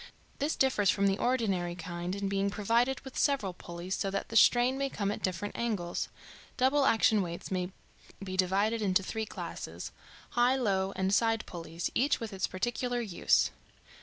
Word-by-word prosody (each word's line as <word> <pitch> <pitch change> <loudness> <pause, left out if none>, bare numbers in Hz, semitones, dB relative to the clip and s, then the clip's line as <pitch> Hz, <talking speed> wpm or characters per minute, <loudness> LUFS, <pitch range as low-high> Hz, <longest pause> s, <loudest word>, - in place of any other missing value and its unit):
This 295 +3 0
differs 235 -7 +2
from 200 +2 +2
the 195 +1 +2
ordinary 195 -9 0
kind 175 +1 -4
in 200 0 -2
being 195 0 0
provided 230 +6 +1
with 265 -1 -10
several 265 -10 +1
pulleys, 175 +1 -6
so 195 - -1
that 195 0 -3
the 225 - -6
strain 245 +3 +5
may 275 0 -1
come 200 -5 -1
at - - -5
different 185 +2 -2
angles. 205 -7 -2 0.5
Double 270 +2 +3
action 220 -1 +4
weights 170 0 -5
may 180 0 -1 0.5
be 185 -1 -4
divided 200 +5 +2
into 195 -2 +2
three 220 +3 -3
classes - - -6 0.4
high, 245 +2 +3
low, 195 -6 +1
and 190 +1 0
side 225 0 +2
pulleys 165 -1 -5
each 280 +4 +2
with 225 -3 -5
its 190 - -1
particular 240 +5 -2
use. 170 - +2
200 Hz, 170 wpm, -31 LUFS, 185-240 Hz, 0.5 s, strain